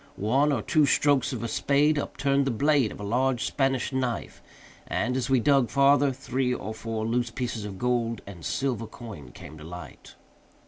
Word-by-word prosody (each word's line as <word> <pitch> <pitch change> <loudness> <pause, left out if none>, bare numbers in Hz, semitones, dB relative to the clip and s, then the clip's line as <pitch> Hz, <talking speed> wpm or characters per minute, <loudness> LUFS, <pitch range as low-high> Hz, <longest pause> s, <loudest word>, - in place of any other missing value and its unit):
One 135 +9 +2
or 125 -7 -1
two 155 -3 +3
strokes 145 0 +3
of 120 -3 -4
a - - -1
spade 145 +5 +2
upturned 140 -1 0
the - - +1
blade 140 -1 +2
of - - -10
a - - -6
large 125 +3 +1
Spanish 135 -1 0
knife, 130 -3 -3 0.5
and, 125 +1 -1
as 130 0 -1
we 135 -1 +4
dug 135 -1 +3
farther, 140 0 +4
three 130 0 -2
or 110 -3 -3
four 110 0 -4
loose 120 +1 0
pieces 115 -3 -4
of 100 -2 -7
gold 120 -1 0
and 95 -5 -10
silver 115 - -2
coin 110 - -10
came 80 +2 -11
to - - -10
light. 90 +1 -10
125 Hz, 185 wpm, -27 LUFS, 110-140 Hz, 0.5 s, we